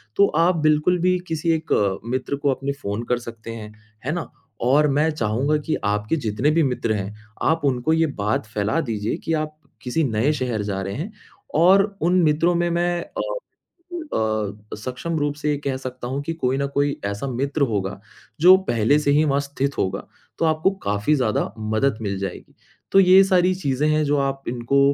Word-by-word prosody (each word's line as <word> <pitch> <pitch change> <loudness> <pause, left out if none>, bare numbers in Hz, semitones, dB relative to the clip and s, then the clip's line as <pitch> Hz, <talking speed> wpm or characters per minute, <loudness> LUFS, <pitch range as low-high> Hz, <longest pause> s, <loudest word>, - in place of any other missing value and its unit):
तो 200 - +5 0.2
आप 180 0 +3
बिल्कुल 155 +3 +2
भी 185 +1 +3
किसी 165 0 0
1 105 -12 0
मित्र 130 +3 -2
को 140 0 +1
अपने 135 +2 -3
फ़ोन 100 +3 -3
कर 125 -1 +2
सकते 115 -1 -9
हैं, 110 -2 -8 0.3
है 150 - 0
ना? 175 -1 -4 0.3
और 140 +5 +4
मैं 150 +3 +2
चाहूँगा 130 +3 0
कि 160 - 0
आपके 105 +6 0
जितने 125 0 0
भी 165 +1 +3
मित्र 125 -5 0
हैं, 100 0 -4 0.3
आप 160 +1 +2
उनको 135 +3 +1
ये 165 0 +3
बात 105 +2 0
फ़ैला 110 +7 -1
दीजिए 110 -5 -2
कि 165 - 0
आप 155 0 -2 0.2
किसी 135 +6 0
नए 120 +2 +1
शहर 125 -6 -2
जा 95 -2 -3
रहे 95 +1 -4
हैं, 175 - -4 0.4
और 185 +5 +6 0.2
उन 180 +2 +3
मित्रों 160 +3 +3
में 175 0 +1
मैं 175 0 0
अ - - -6 0.9
अ, 105 -1 -2
सक्षम 130 +9 -4
रूप 145 0 -1
से 150 0 -2
ये 145 - 0
कह 135 -1 0
सकता 130 -1 -6
हूँ 135 +2 -2
कि 165 - -3
कोई 135 -4 -1
ना 140 - 0
कोई 145 0 +2
ऐसा 100 +6 -3
मित्र 140 +4 -2
होगा, 100 -1 -2 0.4
जो 185 +2 +9
पहले 120 +6 +3
से 145 -1 +1
ही 150 +2 +4
वहाँ 140 -1 +2
स्थित 140 0 -3
होगा, 95 - -2 0.3
तो 165 - +2
आपको 160 +4 +2
काफ़ी 105 +8 +1
ज़्यादा 120 -7 0
मदद 110 +3 0
मिल 100 -2 -2
जाएगी। 95 -2 -6 0.4
तो 195 - +6
ये 190 +1 +7
सारी 185 -1 +3
चीज़ें 145 -4 0
हैं 155 0 +2
जो 145 +1 +2
आप 135 0 -2
इनको 120 +3 0
140 Hz, 195 wpm, -22 LUFS, 110-155 Hz, 0.9 s, जो